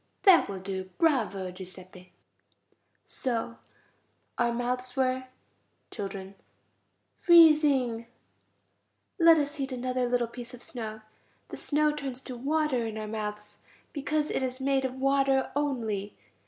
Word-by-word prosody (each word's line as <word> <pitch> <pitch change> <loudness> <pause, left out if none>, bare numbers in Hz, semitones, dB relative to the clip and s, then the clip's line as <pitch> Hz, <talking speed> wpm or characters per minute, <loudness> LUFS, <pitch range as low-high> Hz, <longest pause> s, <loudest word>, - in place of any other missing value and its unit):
That 375 - +6
will 195 - -4
do. 190 0 -5
Bravo, 220 - +1
Giuseppe. 185 0 -12 0.9
So 235 -2 -3 0.8
our 240 -1 +2
mouths 250 +1 -3
were... 260 -1 0 0.7
Children. 195 -1 -6 0.9
Freezing. 295 -9 +5 1.1
Let 330 -1 +7
us 290 0 -2
eat 270 0 -2
another 255 0 -1
little 245 -1 +1
piece 240 +1 -9
of 245 - -13
snow. 220 -3 -6 0.5
The - - -7
snow 300 0 +1
turns 275 -4 -5
to 255 - -7
water 275 -2 0
in 220 -1 -6
our 215 - -4
mouths, 210 -1 -6 0.3
because 300 +1 -1
it - - -1
is 255 0 -3
made 270 0 +1
of 260 0 -3
water 270 0 +2
only. 225 -9 -2
250 Hz, 125 wpm, -28 LUFS, 220-280 Hz, 1.1 s, Let